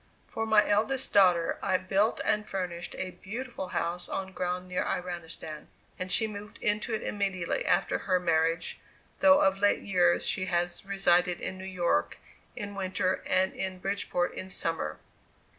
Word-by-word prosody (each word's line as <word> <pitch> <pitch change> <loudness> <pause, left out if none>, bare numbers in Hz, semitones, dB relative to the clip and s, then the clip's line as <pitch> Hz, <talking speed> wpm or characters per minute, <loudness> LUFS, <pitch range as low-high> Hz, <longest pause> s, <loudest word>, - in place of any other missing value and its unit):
For 225 0 -3
my 215 -1 +5
eldest 225 +6 +1
daughter 180 -4 +4
I 190 -2 +2
built 195 +4 +1
and 210 0 +1
furnished 175 -3 -4
a 185 - -3
beautiful 235 -1 -5
house 175 0 -2
on 190 0 -3
ground 180 0 -3
near 180 0 -1
Iranistan, 165 -3 -5 0.3
and 185 0 -3
she 220 - +4
moved 210 -1 -8
into 210 +1 0
it - - -4
immediately 195 -4 -1
after 180 +1 +2
her 185 -2 +1
marriage, 165 -1 +1 0.4
though 285 0 +7
of 195 0 +3
late 205 0 +3
years 180 -3 +3
she 185 -1 -1
has 175 -1 -1
resided 180 -3 +3
in 185 - -4
New 190 - -7
York 175 - 0 0.4
in 205 0 -5
winter 185 -1 -1
and 190 0 +2
in 190 -1 -3
Bridgeport 185 -2 -1
in 185 - -6
summer. 165 -3 -2
185 Hz, 160 wpm, -29 LUFS, 175-200 Hz, 0.4 s, though